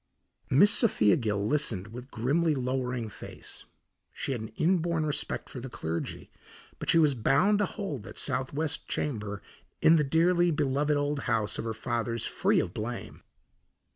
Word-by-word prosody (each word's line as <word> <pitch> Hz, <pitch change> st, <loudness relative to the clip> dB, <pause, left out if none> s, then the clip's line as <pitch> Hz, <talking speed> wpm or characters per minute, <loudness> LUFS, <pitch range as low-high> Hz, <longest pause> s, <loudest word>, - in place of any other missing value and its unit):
Miss 200 Hz, +11 st, +6 dB
Sophia 110 Hz, -, +4 dB
Gill 105 Hz, -5 st, -1 dB
listened 110 Hz, -8 st, +1 dB
with 125 Hz, +4 st, -9 dB
grimly 150 Hz, +8 st, +1 dB
lowering 125 Hz, -2 st, -2 dB
face. 105 Hz, -, -9 dB, 0.5 s
She -, -, -4 dB
had 120 Hz, -4 st, -2 dB
an 110 Hz, -, -5 dB
inborn 170 Hz, -2 st, +1 dB
respect 150 Hz, -, 0 dB
for 130 Hz, -, -8 dB
the 130 Hz, +2 st, -7 dB
clergy, 85 Hz, -7 st, -5 dB, 0.5 s
but -, -, -5 dB
she -, -, +5 dB
was 155 Hz, -3 st, +4 dB
bound 140 Hz, -, +2 dB
to 205 Hz, -, +2 dB
hold 180 Hz, -, -5 dB
that -, -, -9 dB
southwest 145 Hz, +4 st, 0 dB
chamber 105 Hz, -7 st, -3 dB, 0.4 s
in 165 Hz, +1 st, +6 dB
the 150 Hz, -, +3 dB
dearly 175 Hz, +4 st, +3 dB
beloved 145 Hz, -1 st, +1 dB
old 145 Hz, 0 st, -1 dB
house 110 Hz, -2 st, +1 dB
of -, -, -3 dB
her 115 Hz, -1 st, -3 dB
fathers 115 Hz, 0 st, -2 dB
free -, -, +1 dB
of 85 Hz, -, -2 dB
blame. 115 Hz, +3 st, -6 dB
135 Hz, 160 wpm, -28 LUFS, 115-155 Hz, 0.5 s, Miss